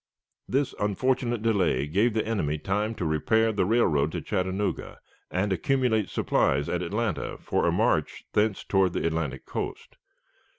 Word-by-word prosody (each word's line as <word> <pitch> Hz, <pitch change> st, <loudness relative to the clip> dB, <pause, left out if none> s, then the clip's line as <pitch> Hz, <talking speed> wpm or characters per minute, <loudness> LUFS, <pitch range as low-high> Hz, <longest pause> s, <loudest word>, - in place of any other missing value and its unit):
This 135 Hz, +1 st, 0 dB
unfortunate 120 Hz, +2 st, 0 dB
delay 95 Hz, -, +2 dB
gave 105 Hz, +9 st, +1 dB
the 110 Hz, -, +1 dB
enemy 90 Hz, -10 st, -1 dB
time 105 Hz, +7 st, -1 dB
to 95 Hz, -, -3 dB
repair 110 Hz, +9 st, +2 dB
the 100 Hz, -4 st, 0 dB
railroad 80 Hz, -10 st, +2 dB
to -, -, -3 dB
Chattanooga, 95 Hz, +2 st, -2 dB, 0.3 s
and 95 Hz, +2 st, 0 dB
accumulate 110 Hz, 0 st, +1 dB
supplies 70 Hz, +2 st, +1 dB
at 90 Hz, -, -1 dB
Atlanta 105 Hz, +4 st, -2 dB
for -, -, 0 dB
a -, -, +3 dB
march -, -, +1 dB
thence 105 Hz, -1 st, +1 dB
toward 95 Hz, -3 st, +2 dB
the -, -, -1 dB
Atlantic 80 Hz, -5 st, -2 dB
coast. -, -, -5 dB
100 Hz, 145 wpm, -27 LUFS, 85-110 Hz, 0.3 s, a